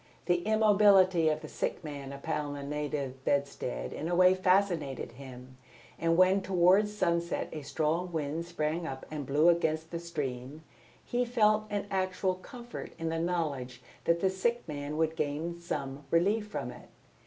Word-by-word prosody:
The 175 Hz, -1 st, +2 dB
immobility 200 Hz, -6 st, +5 dB
of 155 Hz, 0 st, -1 dB
the 155 Hz, -, -7 dB
sick 175 Hz, -, -3 dB
man 140 Hz, -3 st, -6 dB
upon 145 Hz, +1 st, -3 dB
the 140 Hz, -, -6 dB
native 140 Hz, -2 st, -3 dB
bedstead 140 Hz, -, -1 dB
in 160 Hz, -, -4 dB
a 175 Hz, -, +1 dB
way 185 Hz, +1 st, +6 dB
fascinated 185 Hz, -9 st, +1 dB
him, 130 Hz, 0 st, -11 dB, 0.4 s
and 165 Hz, 0 st, +2 dB
when 185 Hz, +2 st, +5 dB
towards 190 Hz, +3 st, +3 dB
sunset 170 Hz, -2 st, 0 dB
a 155 Hz, -, -5 dB
strong 160 Hz, +5 st, -1 dB
wind 160 Hz, +1 st, -2 dB
sprang 165 Hz, 0 st, -2 dB
up 130 Hz, -2 st, -6 dB
and 145 Hz, -4 st, -5 dB
blew 150 Hz, +4 st, +3 dB
against 160 Hz, -2 st, +1 dB
the 170 Hz, -, -3 dB
stream, 145 Hz, -3 st, -5 dB, 0.4 s
he 245 Hz, +1 st, 0 dB
felt 215 Hz, -3 st, +3 dB
an 205 Hz, -1 st, -2 dB
actual 185 Hz, 0 st, 0 dB
comfort 240 Hz, +6 st, -9 dB
in 165 Hz, 0 st, -2 dB
the 165 Hz, 0 st, -1 dB
knowledge 145 Hz, -8 st, -2 dB, 0.2 s
that 170 Hz, 0 st, +2 dB
the 190 Hz, -, +3 dB
sick 235 Hz, +6 st, -1 dB
man 145 Hz, 0 st, -4 dB
would 160 Hz, 0 st, +1 dB
gain 160 Hz, +4 st, -2 dB
some 145 Hz, -4 st, -4 dB
relief 205 Hz, +6 st, +2 dB
from 125 Hz, -, -4 dB
it. 125 Hz, -, -13 dB
165 Hz, 165 wpm, -30 LUFS, 145-185 Hz, 0.4 s, way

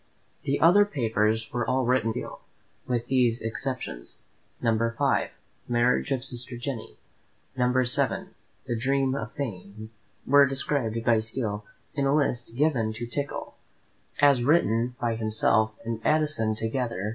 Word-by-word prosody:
The 140 Hz, +1 st, 0 dB
other 180 Hz, +5 st, +6 dB
papers 115 Hz, -, 0 dB
were 120 Hz, 0 st, 0 dB
all 130 Hz, 0 st, +1 dB
written 125 Hz, -2 st, +2 dB
by -, -, -1 dB
Steele, -, -, -6 dB, 0.5 s
with 120 Hz, -2 st, -1 dB
these 125 Hz, -3 st, +2 dB
exceptions: 115 Hz, -, -5 dB, 0.4 s
No. 115 Hz, -2 st, +2 dB
V., 115 Hz, +1 st, +1 dB, 0.4 s
"Marriage 120 Hz, +3 st, +2 dB
of 130 Hz, -1 st, -1 dB
Sister 125 Hz, -1 st, -4 dB
Jenny," 120 Hz, -2 st, -6 dB, 0.6 s
and 125 Hz, -1 st, +2 dB
No. 130 Hz, +1 st, +3 dB
VII., 125 Hz, -, 0 dB, 0.3 s
"The 120 Hz, -, -2 dB
Dream 135 Hz, +2 st, +1 dB
of 140 Hz, -, -4 dB
Fame," 110 Hz, -4 st, -6 dB, 0.3 s
were 140 Hz, +1 st, +6 dB
described 130 Hz, -4 st, -1 dB
by 115 Hz, -2 st, +4 dB
Steele, 110 Hz, -2 st, -3 dB, 0.3 s
in 140 Hz, -2 st, 0 dB
a 140 Hz, -, +3 dB
list 120 Hz, -5 st, -1 dB
given 125 Hz, -6 st, +1 dB
to 115 Hz, +2 st, -5 dB
Tickell, 140 Hz, +4 st, -4 dB, 0.7 s
as 140 Hz, -3 st, +5 dB
written 125 Hz, -5 st, +2 dB
by 120 Hz, -1 st, 0 dB
himself 110 Hz, 0 st, +1 dB
and 115 Hz, -1 st, -3 dB
Addison 150 Hz, -8 st, +1 dB
together. 110 Hz, -2 st, -2 dB
120 Hz, 145 wpm, -26 LUFS, 115-135 Hz, 0.7 s, other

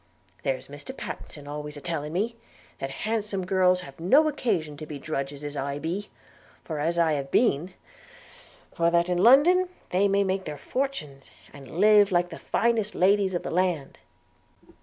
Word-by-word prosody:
There's 135 Hz, -2 st, -2 dB
Mr 145 Hz, 0 st, -9 dB
Pattenson 145 Hz, -2 st, -7 dB
always 150 Hz, 0 st, -6 dB
a -, -, -6 dB
telling 150 Hz, -2 st, -4 dB
me, 220 Hz, +6 st, -1 dB, 0.4 s
that 135 Hz, -, -3 dB, 0.2 s
handsome 210 Hz, -4 st, -1 dB
girls 185 Hz, -1 st, +3 dB
have 140 Hz, -3 st, -12 dB
no 270 Hz, -, +5 dB
occasion 175 Hz, -, -1 dB
to 155 Hz, -, -8 dB
be 150 Hz, -, -6 dB
drudges 140 Hz, 0 st, -4 dB
as 145 Hz, 0 st, -5 dB
I 140 Hz, 0 st, -3 dB
be, 175 Hz, +7 st, -4 dB, 0.6 s
or 155 Hz, -3 st, -3 dB
as 165 Hz, +3 st, 0 dB
I 165 Hz, -2 st, +3 dB
have 140 Hz, -2 st, -3 dB
been; 180 Hz, -, +1 dB, 1.0 s
for 170 Hz, 0 st, +2 dB
that 170 Hz, +1 st, +2 dB
in 180 Hz, -1 st, +1 dB
London 305 Hz, -, +6 dB, 0.2 s
they 190 Hz, +3 st, +3 dB
may 200 Hz, 0 st, +2 dB
make 190 Hz, 0 st, -1 dB
their 150 Hz, -1 st, -5 dB
fortunes, 150 Hz, -, -4 dB, 0.2 s
and 140 Hz, +3 st, -9 dB
live 210 Hz, 0 st, +6 dB
like 175 Hz, 0 st, +2 dB
the 165 Hz, -, -9 dB
finest 225 Hz, -3 st, 0 dB
ladies 195 Hz, 0 st, +3 dB
of 175 Hz, -, -2 dB
the -, -, -4 dB
land.' 175 Hz, -5 st, -1 dB
175 Hz, 170 wpm, -26 LUFS, 145-200 Hz, 1.0 s, London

